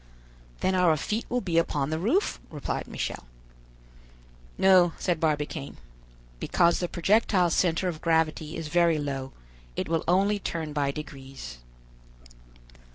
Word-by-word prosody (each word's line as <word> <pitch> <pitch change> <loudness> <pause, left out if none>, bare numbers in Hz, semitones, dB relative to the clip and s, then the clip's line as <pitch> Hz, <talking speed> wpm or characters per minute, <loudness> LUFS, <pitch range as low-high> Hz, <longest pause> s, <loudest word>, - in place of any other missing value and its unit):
"Then 190 - +2
our 180 -4 +4
feet 215 +9 -2
will 245 0 0
be 170 -5 +2
upon 145 -3 -1
the 160 - -1
roof," 255 - +1
replied 150 -3 -4
Michel. - - -4 1.3
"No," 185 -3 +5
said 175 -3 -1
Barbicane, 150 -2 -2 0.6
"because 170 -1 +2
the 175 - -1
projectile's 185 -2 +2
center 180 +1 +2
of 160 -3 -4
gravity 160 -1 0
is 165 -2 -4
very 170 0 +3
low; 135 -2 -3 0.4
it - - -2
will 165 0 0
only 200 +4 +3
turn 160 -5 -4
by 145 -1 0
degrees." 135 - -8
165 Hz, 130 wpm, -27 LUFS, 150-180 Hz, 1.3 s, No